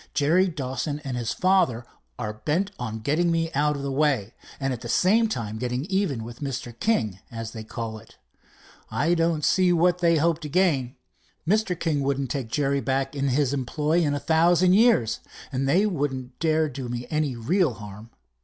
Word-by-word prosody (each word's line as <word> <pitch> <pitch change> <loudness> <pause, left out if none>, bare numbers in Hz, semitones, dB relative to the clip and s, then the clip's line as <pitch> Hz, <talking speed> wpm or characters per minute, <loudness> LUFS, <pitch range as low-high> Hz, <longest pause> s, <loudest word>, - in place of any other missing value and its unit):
"Jerry 165 +6 +3
Dawson 145 -2 -3
and 135 -3 -4
his 120 -1 -2
father 185 -11 +2 0.3
are 105 -3 -3
bent 160 - -1
on 110 -2 -4
getting 155 +9 +1
me 165 -1 0
out 150 +1 +2
of 140 - -5
the 140 - -2
way, 135 -7 +1 0.3
and 135 -1 -1
at 120 - -7
the 120 - -7
same 215 - +3
time 110 - -4
getting 125 +3 -2
even 190 - 0
with 120 +1 -9
Mr. 130 -4 -4
King, 110 - 0
as 115 -1 -6
they 110 -1 -7
call 110 -1 -5
it. 110 - -19 0.7
I 140 +10 +1
don't 165 -2 +1
see 185 -1 +3
what 175 +1 +3
they 170 -1 +3
hope 165 +1 +2
to 150 -3 -7
gain. 145 -7 +1 0.5
Mr. 200 -2 +1
King 155 -4 0
wouldn't 135 -1 -1
take 135 -5 -3
Jerry 140 +2 0
back 135 +3 -1
in 140 0 0
his 135 +1 +1
employ 150 +5 0
in 145 -4 +1
a - - -2
thousand 170 +5 +4
years, 210 - +4 0.3
and 135 0 -1
they 185 +8 +4
wouldn't 135 -9 -3
dare 160 -1 +2
to 145 - -9
do 125 - -5
me 120 0 -4
any 150 -4 0
real 145 - +1
harm. 105 +1 -10
140 Hz, 190 wpm, -25 LUFS, 125-170 Hz, 0.7 s, thousand